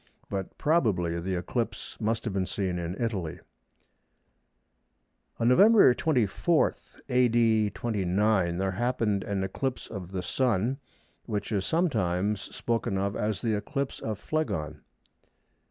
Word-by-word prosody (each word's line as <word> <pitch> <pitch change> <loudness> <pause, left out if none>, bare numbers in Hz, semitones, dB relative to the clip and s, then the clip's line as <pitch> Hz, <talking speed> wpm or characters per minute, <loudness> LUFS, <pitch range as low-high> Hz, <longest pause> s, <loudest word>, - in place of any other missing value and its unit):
But 95 -1 -4
probably 100 - +1
the 95 +2 -2
eclipse 115 +7 -3
must 110 +1 0
have 110 - -3
been 95 -1 0
seen 95 -3 -2
in 85 +2 -4
Italy. 100 -9 -2 2.0
On 115 - +2
November 195 - +7
24, 155 - +2 0.3
A.D. 115 -4 +3
29, 100 -4 +1
there 95 +1 0
happened 105 -1 0
an 100 -2 -2
eclipse 125 +7 -3
of 95 -4 -7
the 95 -2 -3
Sun 120 +4 0 0.5
which 105 -1 -3
is 100 -3 0
sometimes 105 - +1
spoken 115 -4 -2
of 100 +1 -1
as 105 +1 -2
the 115 -2 +1
"eclipse 135 +6 -3
of 110 -2 -3
Phlegon." 80 - -3
105 Hz, 120 wpm, -28 LUFS, 95-120 Hz, 2.0 s, November